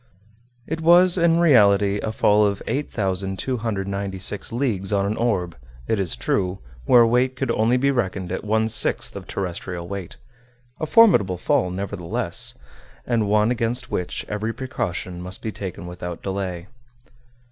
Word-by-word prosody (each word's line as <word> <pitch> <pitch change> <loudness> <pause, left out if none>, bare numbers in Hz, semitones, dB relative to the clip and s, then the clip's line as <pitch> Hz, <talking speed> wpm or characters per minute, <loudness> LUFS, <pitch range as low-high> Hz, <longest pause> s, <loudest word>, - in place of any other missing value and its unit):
It 160 +1 -4
was 175 +2 +6
in 170 -2 +3
reality 105 -10 +4
a 110 - -3
fall 105 -1 +3
of 100 -1 0
8,296 100 -3 -2
leagues 115 -6 -1
on 100 -1 +1
an 105 +2 -1
orb, 95 -8 -1 0.3
it 110 - 0
is 95 -4 -1
true, 95 -1 -1 0.3
where 120 - +6
weight 125 +3 +2
could 120 - -1
only 115 +2 +2
be 140 +2 +2
reckoned 95 -7 -2
at 95 - -3
one 110 +1 +1
sixth 115 +2 0
of 95 -2 -8
terrestrial 90 -2 -5
weight; 95 -2 -7 0.6
a 155 - -2
formidable 160 - +5
fall, 90 +1 +1
nevertheless, 90 -2 -3 0.5
and 115 -4 0
one 105 +2 +3
against 120 +1 -2
which 90 - -3
every 105 +2 -2
precaution 95 -8 -4
must 90 +1 -8
be 110 - -2
taken 95 -4 -7
without 90 -1 -7
delay. 95 -3 -3
105 Hz, 145 wpm, -23 LUFS, 95-120 Hz, 0.6 s, was